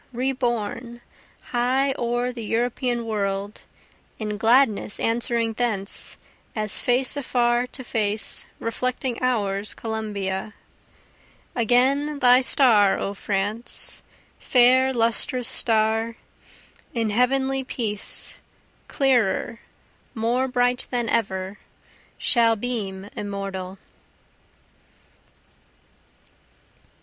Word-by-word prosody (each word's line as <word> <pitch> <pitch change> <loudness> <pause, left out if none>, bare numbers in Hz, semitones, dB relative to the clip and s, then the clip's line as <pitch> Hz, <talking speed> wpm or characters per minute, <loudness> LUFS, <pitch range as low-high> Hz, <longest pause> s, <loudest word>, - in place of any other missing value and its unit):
reborn, 240 -2 -2 0.5
high 260 +3 +2
o'er 240 +1 -1
the 235 -2 -6
European 240 +2 -1
world, 200 -2 -2 0.6
(In 210 -1 -3
gladness 225 -1 +3
answering 230 0 0
thence, 215 -4 -1 0.4
as 215 -1 -1
face 250 +2 +1
afar 245 -3 +1
to 260 +1 -9
face, 215 -3 0
reflecting 250 +1 -2
ours 210 -5 -1
Columbia,) 210 -3 -4 1.0
Again 265 +5 +2
thy 250 -2 +6
star 225 -7 +4
O 200 - -3
France, 205 +3 -3 0.4
fair 255 +1 +4
lustrous 240 +1 +1
star, 225 0 +2 0.8
In 225 -2 0
heavenly 265 +3 +1
peace, 215 -5 -2 0.5
clearer, 245 -4 +1 0.6
more 240 +4 +1
bright 245 -1 +1
than 240 -2 -1
ever, 195 -3 -1 0.6
Shall 230 -3 +3
beam 205 -4 -4
immortal. 195 -2 -5
235 Hz, 80 wpm, -24 LUFS, 210-250 Hz, 1.0 s, thy